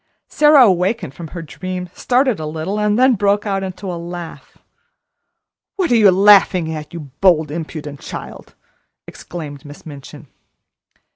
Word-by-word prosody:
Sara 295 -3 +5
awakened 185 - +1
from 165 +3 -9
her 170 +1 -8
dream, 180 +3 -6
started 255 - +1
a 155 - -4
little, 160 +7 -4
and 210 0 +1
then 260 +1 +5
broke 205 0 +1
into 195 -1 -4
a 170 - -6
laugh. 175 -1 -9 1.2
"What 370 -7 -1
are - - +5
you 215 -3 +6
laughing 190 -3 +4
at, 150 -1 -7
you 170 - -7 0.2
bold, 160 -6 +3
impudent 155 -3 -6
child!" - - -9 0.5
exclaimed 150 -5 -9
Miss 145 -1 -13
Minchin. 145 -4 -11
180 Hz, 140 wpm, -18 LUFS, 160-210 Hz, 1.2 s, you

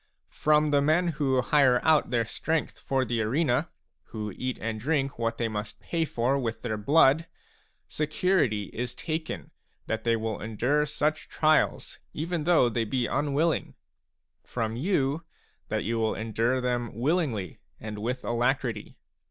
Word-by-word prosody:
From 150 0 +3
the 145 -1 +4
men 160 +5 +3
who 135 -4 +1
hire 130 -2 +4
out 160 -5 +4
their 120 -2 +1
strength 160 +7 -2
for 135 -1 0
the 120 -2 -1
arena, 125 +3 +1 0.4
who 105 -2 -5
eat 130 0 -3
and 110 0 -3
drink 140 +1 -1
what 115 -1 -1
they 115 - 0
must 105 0 -5
pay 165 -1 -1
for 130 0 0
with 115 -3 -3
their 115 -3 -1
blood, 145 +7 +4 0.6
security 150 - 0
is 125 +1 -4
taken 160 0 -4 0.3
that 110 0 -3
they 115 -1 +3
will 110 -1 -3
endure 125 +8 0
such 150 +1 -1
trials 155 0 +1
even 165 0 -2
though 170 -7 +5
they 115 0 0
be 120 +3 -1
unwilling; 145 +4 0 0.7
from 115 -2 -3
you, 145 0 0 0.4
that - - -1
you 115 +2 -1
will 110 -1 +1
endure 115 +3 0
them 120 -1 -1
willingly 130 - -1 0.2
and 105 -1 -6
with 125 +4 -3
alacrity. 120 -2 -1
130 Hz, 150 wpm, -27 LUFS, 115-150 Hz, 0.7 s, though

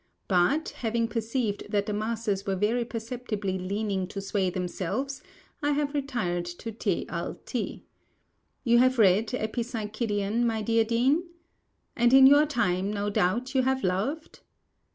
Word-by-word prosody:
But, 205 - +2
having 230 0 0
perceived 225 -1 -2
that 205 -1 +1
the 210 - -3
masses 215 -2 -2
were 195 - +1
very 215 +5 +1
perceptibly 225 -4 -4
learning 195 0 -2
to 195 - -6
sway 195 -1 0
themselves, 195 +9 -3 0.4
I 290 0 +1
have 285 0 -1
retired 240 -12 -1
to 175 +6 -6
Te 220 - -1
a - - -3
Iti. - - -5 0.8
You 235 -2 +4
have 255 +1 +4
read 210 0 +4
"Epipsychidion," 220 -2 -2
my 225 -2 0
dear 230 +1 +3
Dean? 255 +9 +2 0.7
And, 240 -1 +4
in 270 0 +9
your 290 +3 +7
time, 195 -8 0
no 205 0 -2
doubt 225 +8 0
you 265 - +3
have 265 +1 0
loved? 210 - -2
225 Hz, 145 wpm, -27 LUFS, 200-250 Hz, 0.8 s, in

